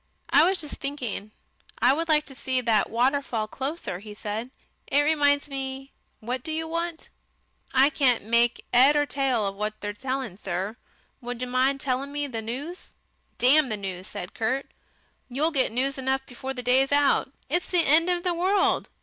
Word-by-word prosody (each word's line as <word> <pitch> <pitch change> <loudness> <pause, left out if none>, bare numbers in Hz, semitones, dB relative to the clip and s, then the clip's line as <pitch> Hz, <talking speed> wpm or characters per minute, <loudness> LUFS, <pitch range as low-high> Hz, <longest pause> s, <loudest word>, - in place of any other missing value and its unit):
"I 295 - +7
was 380 - -1
just 300 -3 -4
thinking 255 -7 -4 0.5
I 250 +2 +4
would 330 +3 -2
like 300 -1 +4
to 270 - -8
see 260 -1 -1
that 230 -4 +2
waterfall 245 -2 0
closer," 265 - -4
he 210 +1 -10
said. 215 +3 -4 0.4
"It 285 - +4
reminds 290 -2 +3
me 270 -1 -5 0.3
what 245 +3 -3
do 315 - -4
you 320 +1 -1
want?" 335 0 -3 0.6
"I 270 +2 +5
can't 255 -6 +2
make 235 +2 +2
'ead 265 +4 +7
or 295 0 +3
tail 265 -6 0
of 195 - -2
what 210 +1 -3
they're 205 0 -4
saying, 255 -3 -4
sir. 190 +4 -3 0.5
Would 245 -1 -5
you - - -3
mind 260 +2 +1
telling 270 +1 -1
me 290 0 -2
the 235 -5 -4
news?" 275 +11 -6 0.4
"Damn 275 +3 +5
the 215 - -2
news," 190 -2 -6
said 175 - -7
Kurt. 260 +5 -2 0.6
"You'll 295 +6 0
get 265 -7 +1
news 265 +3 0
enough 265 0 -1
before 265 +2 -6
the 250 - -5
day's 260 +3 +3
out. 285 -2 +3 0.2
It's 350 +6 -1
the 350 -2 +2
end 325 +5 +5
of 350 -1 0
the 360 - +1
world. 375 +3 +1
265 Hz, 185 wpm, -26 LUFS, 235-290 Hz, 0.6 s, I